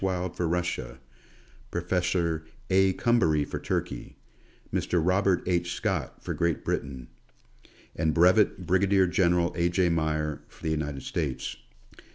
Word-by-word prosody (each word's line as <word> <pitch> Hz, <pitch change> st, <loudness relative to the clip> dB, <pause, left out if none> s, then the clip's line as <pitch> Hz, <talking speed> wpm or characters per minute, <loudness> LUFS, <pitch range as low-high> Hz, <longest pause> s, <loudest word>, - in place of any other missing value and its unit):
Wild 90 Hz, -2 st, -1 dB
for 90 Hz, -, -1 dB
Russia; 80 Hz, -8 st, -2 dB, 0.7 s
Professor 85 Hz, -2 st, 0 dB, 0.3 s
A. 95 Hz, 0 st, +4 dB
Coumbary 80 Hz, -11 st, +2 dB
for -, -, -5 dB
Turkey; -, -, -3 dB, 0.6 s
Mr. 90 Hz, -, +1 dB
Robert 90 Hz, +2 st, +2 dB
H. 85 Hz, -1 st, 0 dB
Scott -, -, -3 dB
for -, -, -3 dB
Great 85 Hz, -3 st, -1 dB
Britain; 65 Hz, -3 st, -3 dB, 0.9 s
and 80 Hz, 0 st, +1 dB
Bvt. 90 Hz, +5 st, +5 dB
Brig. 95 Hz, 0 st, +3 dB
General 85 Hz, -3 st, +2 dB
A. 85 Hz, 0 st, +2 dB
J. 90 Hz, 0 st, +2 dB
Meyer, 75 Hz, -2 st, -1 dB
for -, -, -20 dB
the 80 Hz, -, 0 dB
United 75 Hz, -3 st, -3 dB
States. 75 Hz, -6 st, -3 dB
85 Hz, 130 wpm, -27 LUFS, 80-90 Hz, 0.9 s, Bvt